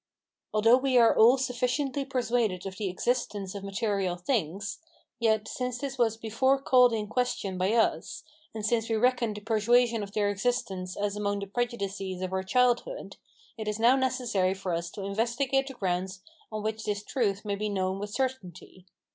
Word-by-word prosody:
Although 225 +3 +5
we 260 -1 +2
are 230 -2 +6
all 235 +4 +7
sufficiently 260 +2 -1
persuaded 235 -8 0
of 190 0 -6
the 205 -3 -2
existence 205 -1 -2
of 200 -1 -7
material 195 -2 -1
things, 195 - -2 0.4
yet, 220 -2 +2
since 250 0 -3
this 275 0 -5
was 225 -2 +2
before 230 +5 +1
called 250 -2 +5
in 220 -2 -1
question 215 -4 -2
by 185 +3 +1
us, 230 -1 0 0.3
and 215 -1 -5
since 225 +1 +1
we 225 - +1
reckoned 240 -1 +1
the - - -7
persuasion 230 +2 +2
of 200 0 -7
their 205 -1 +1
existence 195 -4 -2
as 205 0 -1
among 205 -1 -1
the - - -3
prejudices 200 -4 -3
of 185 0 -3
our 190 - 0
childhood, 250 - 0 0.4
it 215 - -4
is 210 0 -1
now 235 +3 +5
necessary 245 -8 0
for 190 -2 -3
us 170 +1 -2
to 195 - -8
investigate 240 +7 0
the 270 - -8
grounds 185 -1 -2 0.3
on 215 -1 -4
which 220 0 -3
this 205 -1 -2
truth 210 -5 -1
may 205 - -1
be 210 +1 -2
known 190 -1 -1
with 205 +1 -4
certainty. 205 -7 -5
215 Hz, 180 wpm, -28 LUFS, 195-245 Hz, 0.4 s, all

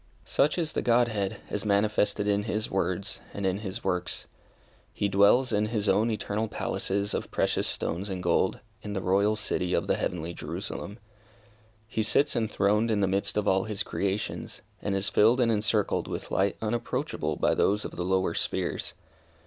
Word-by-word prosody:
Such 150 - +2
is 165 -3 -1
the - - 0
Godhead, 115 -5 +1
as 105 - -2
manifested 105 0 +1
in 100 0 +2
His 110 0 -2
words, 95 0 -1
and 100 - -3
in 95 +1 +1
His 105 +2 -6
works. 90 0 -2 0.7
He 100 - -1
dwells 100 +6 +4
in 105 +1 +2
His 105 -2 -1
own 110 +3 +3
eternal 110 0 -1
palaces 100 -1 -2
of - - -3
precious - - +1
stones 95 +5 -2
and 95 -2 -4
gold, 90 +2 +1 0.2
in 105 -1 -5
the 95 - -1
Royal 100 +3 +2
City 90 -4 -1
of - - 0
the - - +2
heavenly 85 -1 -3
Jerusalem. 100 +4 -5 0.9
He 110 0 -1
sits 140 +7 +3
enthroned 105 -1 +2
in 105 -2 +1
the 95 - +3
midst 100 +2 0
of 105 -1 0
all 95 0 +3
His 110 -1 -2
creations, 100 +1 -3 0.2
and 100 -1 -1
is 95 +1 +1
filled 115 +5 +4
and 120 -2 +3
encircled 105 -1 +1
with - - -5
light 95 +1 +1
unapproachable 115 +2 -2
by - - +2
those 105 +2 +2
of - - -5
the 90 - -2
lower 95 +1 +1
spheres. - - -2
105 Hz, 175 wpm, -28 LUFS, 95-110 Hz, 0.9 s, dwells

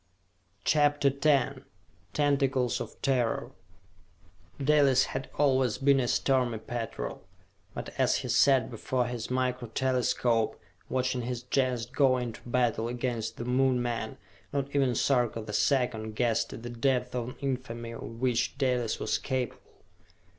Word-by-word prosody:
CHAPTER 145 -2 +3
X 140 -3 +3 0.5
Tentacles 135 -4 +1
of - - -8
Terror 125 -4 0 1.1
Dalis 140 -2 +4
had 135 0 -4
always 130 -5 +3
been 140 0 +4
a 125 - 0
stormy 125 -3 +1
petrel, 115 0 -5 0.5
but - - -5
as - - +3
he - - -2
sat 135 -4 +4
before 125 +2 -1
his 120 -2 -4
Micro 125 -1 -1
Telescope, 120 -2 +1 0.3
watching 130 -1 0
his 120 0 -4
Gens 125 -2 0
go 130 +1 +3
into 120 -3 -5
battle 120 -2 +1
against 120 -2 -3
the 120 - -5
Moon 130 0 +2
men, 115 -2 -3 0.3
not 140 0 -3
even 135 -4 +2
Sarka 120 -3 +2
the 105 -1 -7
Second 110 -1 +1
guessed 115 -1 +1
the - - -7
depth 125 +1 0
of 125 0 -3
infamy 120 -4 -4
of 115 - -8 0.2
which 125 0 0
Dalis 125 -4 0
was - - 0
capable. 130 -4 -4
125 Hz, 130 wpm, -29 LUFS, 120-135 Hz, 1.1 s, Dalis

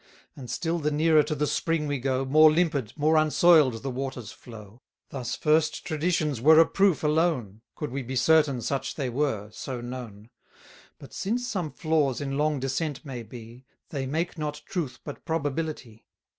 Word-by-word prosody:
And 125 -4 -10
still 165 +7 -2
the 150 -1 0
nearer 155 +1 +4
to 150 +1 -2
the 150 - 0
spring 165 +1 -1
we 145 -2 -2
go, 130 +1 -1
340 130 - -7
More 155 0 +8
limpid, 150 -8 0
more 155 +2 +3
unsoil'd, 155 -6 +4
the 135 - -3
waters 130 -4 -5
flow. 110 0 -13 0.3
Thus 125 -3 -4
first 155 0 +1
traditions 155 -5 -1
were 155 +4 +7
a 165 - +8
proof 195 -4 +2
alone, 150 - 0
Could 150 - -5
we 135 +2 -3
be 130 +1 -6
certain 150 -2 +3
such 135 +3 -3
they 135 -4 -2
were, 115 -6 -2
so 130 +3 -6
known: 120 -3 -8 0.7
But - - -14
since 240 +5 -2
some 185 -9 -2
flaws 150 -6 0
in 135 -1 -3
long 150 0 0
descent 135 +3 -3
may 130 -4 -6
be, 115 +2 -12 0.3
They 135 -3 -4
make 160 +4 -2
not 150 -1 -4
truth 160 -8 -4
but 145 - -9
probability. 150 -7 -4
145 Hz, 175 wpm, -26 LUFS, 125-155 Hz, 0.7 s, More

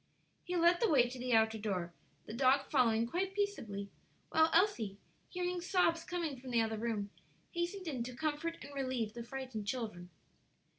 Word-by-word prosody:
He 360 - -3
led 345 +1 +5
the 460 - +4
way 255 -5 +5
to 250 +1 -7
the 250 0 -1
outer 220 0 +4
door, 185 -5 -2 0.3
the - - -7
dog 265 +3 +3
following 230 -5 +4
quite 370 +10 -2
peaceably, 220 - -2 0.4
while 320 0 +5
Elsie, 325 - +2 0.3
hearing 360 -1 -2
sobs 340 -2 +2
coming 330 -7 -3
from 255 +1 -9
the 240 -1 +2
other 220 -1 -1
room, 215 -3 -2 0.4
hastened 345 +2 -3
in 265 -6 -2
to 250 0 -6
comfort 315 +4 -2
and 285 - -10
relieve 255 -5 -2
the 235 0 -6
frightened 245 -4 -5
children. 210 -8 -3
260 Hz, 170 wpm, -35 LUFS, 225-335 Hz, 0.4 s, led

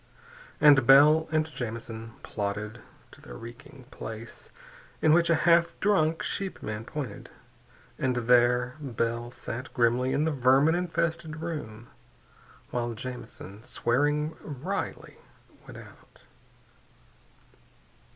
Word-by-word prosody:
And 140 -5 +6
Bell 150 +4 +7
and 155 -1 +2
Jamison 115 -5 -6
plodded 105 +2 -4 0.3
to - - -16
the - - -11
reeking 130 - -12
place 115 +1 -9 0.5
in 155 - +4
which 170 0 +4
a 165 - +5
half 170 0 +4
drunk 165 -6 +2
sheepman 115 - -4
pointed, 145 0 -6 0.7
and 130 -1 0
there 125 +2 +3
Bell 120 -3 -2
sat 125 +1 -7
grimly 120 +2 +2
in 140 +3 +1
the 160 - +1
vermin 135 +3 +4
infested 170 -2 -2
room 120 -10 -6 0.9
while 120 -1 -2
Jamison, 110 -4 -8
swearing 145 +7 0
wryly, 155 +8 -5 0.5
went - - -10
out. - - -16
130 Hz, 105 wpm, -28 LUFS, 115-155 Hz, 0.9 s, Bell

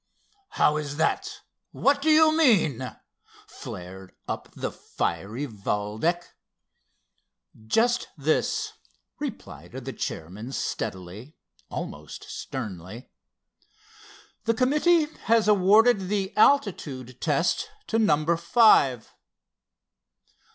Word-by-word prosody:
"How 150 - +4
is 145 -1 -5
that? 160 - -1 0.3
What 280 +1 +1
do 315 - +1
you 315 0 +6
mean?" 160 - +2 0.5
flared 95 +1 -10
up - - -5
the - - -3
fiery 115 +9 -3
Valdec. 110 - -2 1.4
"Just 240 - +2
this," 425 - 0 0.5
replied 275 - -7
the 130 0 -6
chairman 100 +11 -6
steadily, 105 - -5 0.3
almost - - -7
sternly. 105 -1 -7 1.3
"The 230 0 +2
committee 300 +6 +3 0.2
has 225 -1 +3
awarded 205 0 +4
the 195 -1 -2
altitude 150 - +1
test 165 - 0 0.2
to 225 - 0
number 165 -5 +2
five." 170 - +4
160 Hz, 90 wpm, -26 LUFS, -, 1.4 s, you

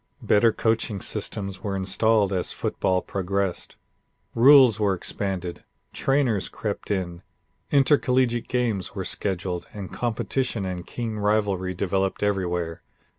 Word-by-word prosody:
Better 110 +2 +4
coaching 110 -2 0
systems 95 0 -4
were 100 -1 -3
installed 100 +1 +2
as 90 -2 0
football 90 -1 -1
progressed. 100 -1 -2 0.6
Rules 130 -3 +7
were 100 -2 +2
expanded, 90 -1 -4 0.3
trainers 135 -8 +1
crept 105 -2 -5
in, 90 -4 -2 0.5
intercollegiate 130 -4 +2
games 115 -8 -1
were 95 -2 -3
scheduled 90 -2 -1
and 100 -3 -7
competition 120 -2 -1
and 90 -1 -5
keen 115 -3 -4
rivalry 100 -3 0
developed 95 +2 -1
everywhere. 90 -5 -1
100 Hz, 115 wpm, -25 LUFS, 95-115 Hz, 0.6 s, Rules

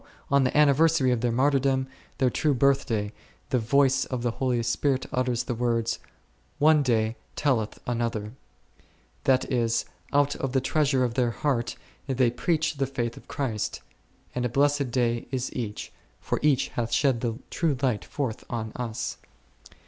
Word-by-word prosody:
on 140 -1 +5
the 125 - +1
anniversary 150 -1 +4
of 120 -2 0
their 120 -1 +1
martyrdom, 135 +1 +2 0.3
their 130 -2 +2
true 150 +2 +1
birth 140 +2 +3
day, 105 -3 -1 0.4
the 125 - +3
voice 135 +3 +3
of 125 -2 -4
the 120 - +1
Holy 125 -1 0
Spirit 130 +3 0
utters 125 -1 0
the 125 - -3
words, 115 -1 0 0.6
One 155 0 +5
day 115 -4 +1 0.2
telleth 120 -7 0
another 120 -2 -1
1, 105 +4 -9 0.9
that 130 -1 +2
is, 120 -2 +1 0.3
out 145 0 +3
of 135 -2 -3
the 135 - +4
treasure 135 -1 +2
of 120 -2 0
their 125 -1 +2
heart 120 -1 -1 0.3
they 130 -3 +2
preach 155 +3 0
the 135 0 0
faith 120 -3 -3
of - - -14
Christ; 115 -7 -3 0.5
and 125 - -2
a 125 - 0
blessed 140 +1 +2
day 120 -1 0
is 130 -1 -3
each, 110 -5 -5 0.3
for - - -2
each 145 -3 +2
hath 115 -1 -3
shed 125 -1 +2
the 115 -2 -2
true 160 -6 0
light 110 -8 +1
forth 120 +4 -4
on 110 -2 -3
us. 120 0 -4
125 Hz, 165 wpm, -26 LUFS, 115-140 Hz, 0.9 s, on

